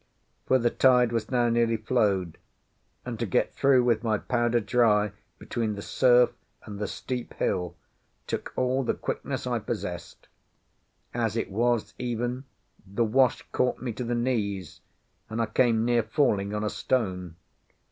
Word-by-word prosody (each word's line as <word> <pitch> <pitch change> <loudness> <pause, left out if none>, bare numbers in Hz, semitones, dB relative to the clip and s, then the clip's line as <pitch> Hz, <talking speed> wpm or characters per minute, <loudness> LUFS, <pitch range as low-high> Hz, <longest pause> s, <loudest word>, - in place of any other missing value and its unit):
For 130 - +5
the 120 -1 +1
tide 125 -2 +4
was 115 -2 -2
now 120 -2 +2
nearly 115 -1 +2
flowed; 105 -7 0 0.7
and - - -5
to - - 0
get - - +1
through 135 -2 +4
with 115 -2 +1
my 110 -2 +1
powder 120 +1 +1
dry 105 -2 +2 0.3
between 110 -3 -3
the 100 - -7
surf 125 -1 +4 0.3
and 105 -2 -8
the 105 - -2
steep 125 +3 -5
hill, 90 -2 -1 0.5
took - - -4
all 130 +1 +1
the - - 0
quickness - - -4
I - - 0
possessed. - - -6 0.9
As 115 -2 -1
it 115 - -2
was, 120 +2 0
even, 120 +2 -3 0.4
the 105 +4 -1
wash 125 +3 +2
caught 125 - 0
me 120 -2 -4
to 125 - -5
the 120 0 -1
knees, 105 -8 -2 0.5
and 110 +1 -4
I 115 - +2
came 115 0 +2
near 120 -1 +3
falling 110 -4 +1
on 105 - -2
a 105 - 0
stone. 90 -9 -1
115 Hz, 155 wpm, -27 LUFS, 105-125 Hz, 0.9 s, For